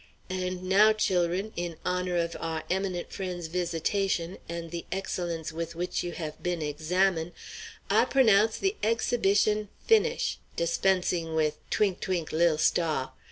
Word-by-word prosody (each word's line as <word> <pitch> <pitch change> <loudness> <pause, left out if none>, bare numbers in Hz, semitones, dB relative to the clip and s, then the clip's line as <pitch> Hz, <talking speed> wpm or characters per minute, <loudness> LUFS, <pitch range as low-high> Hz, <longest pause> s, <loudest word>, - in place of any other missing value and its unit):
And 185 0 -3
now, 205 +4 +5
chil'run, 185 0 0
in 170 -2 -4
honor 180 0 0
of 170 0 -1
our 160 -1 -3
eminent 185 -2 -2
friend's 180 -3 -4
visitation, 175 +1 -1
and 170 0 -4
of 165 - -12
the 170 -1 -4
excellence 175 -4 -3
with 165 +1 -4
which 175 +2 -2
you 175 -1 -4
have 155 -3 -6
been 175 -3 -1
examine', 165 +3 0 0.5
I - - +4
p'onounce 220 -5 +4
the 390 +2 0
exhibition 215 -2 +2 0.2
finish' 460 +2 +2 0.2
dispensing 170 -1 +1
with 155 -1 +1
'Twink', 195 -4 +1
twink' 175 -4 -2
lil 165 -1 +3
stah.' 155 -4 +1
180 Hz, 140 wpm, -28 LUFS, 165-195 Hz, 0.5 s, now